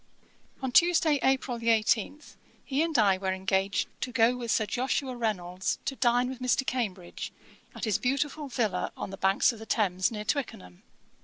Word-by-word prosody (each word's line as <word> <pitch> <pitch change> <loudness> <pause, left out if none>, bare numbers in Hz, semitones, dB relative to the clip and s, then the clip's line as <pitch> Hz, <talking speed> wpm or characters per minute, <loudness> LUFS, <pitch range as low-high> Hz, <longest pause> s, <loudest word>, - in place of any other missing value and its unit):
On 260 - -1
Tuesday, 325 -1 +4
April 265 -2 +1
18, 230 +5 +1 0.4
he 275 +2 0
and 325 -3 +1
I 195 -4 +4
were 190 -1 -1
engaged 190 +1 0
to 250 - -3
go 235 0 +3
with 240 -2 -6
Sir 220 - +2
Joshua 255 +4 -1
Reynolds 185 -6 -2
to 270 - -2
dine 245 -1 +2
with 260 -1 -6
Mr. 255 +1 +1
Cambridge, 200 -9 -3 0.4
at - - -4
his 215 -3 +1
beautiful 280 +3 -1
villa 235 -6 -1
on - - -5
the 195 - -7
banks 195 +5 +3
of 225 - -11
the 220 - -10
Thames, 190 -4 +1
near 210 -1 -5
Twickenham. 90 - -4
235 Hz, 170 wpm, -28 LUFS, 195-260 Hz, 0.4 s, Tuesday